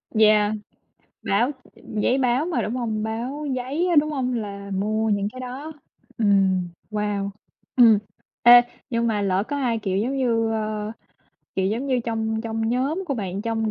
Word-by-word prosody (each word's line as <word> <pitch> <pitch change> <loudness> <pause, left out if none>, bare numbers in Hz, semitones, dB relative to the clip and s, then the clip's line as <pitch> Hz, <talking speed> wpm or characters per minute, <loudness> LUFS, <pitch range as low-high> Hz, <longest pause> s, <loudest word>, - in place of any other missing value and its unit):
Yeah, 215 -1 +5 0.7
báo 235 +7 +2 0.2
giấy 220 +5 -1
báo 255 +3 +2
mà 350 - 0
đúng 235 +4 -2
hông? 220 -3 -2
Báo 245 +7 -3
giấy 280 +8 -1
á, 335 - +2
đúng 305 +1 +4
hông? 255 -3 -1
Là 200 -3 -5
mua 215 +3 0
những 200 -1 +1
cái 255 - -8
đó. 265 +5 -6 0.5
Ừm, 195 -4 +3 0.2
wow! 205 -1 -1 0.5
Ừm. 230 -4 +7 0.4
Ê, 240 0 +10 0.3
nhưng 235 0 +1
mà 210 -2 0
lỡ 190 0 +1
có 285 - -2
ai, 240 -5 0
kiểu 195 -3 -2
giống 250 +7 0
như, 230 -3 +1
ơ, 215 -1 -2 0.6
kiểu 190 0 +1
giống 235 +7 -1
như, 255 -2 +1
trong 220 -1 -1
trong 225 -1 -2
nhóm 275 +10 0
của 275 - -1
bạn 195 -2 -4
trong 225 -1 -1
225 Hz, 170 wpm, -23 LUFS, 210-255 Hz, 0.7 s, Ê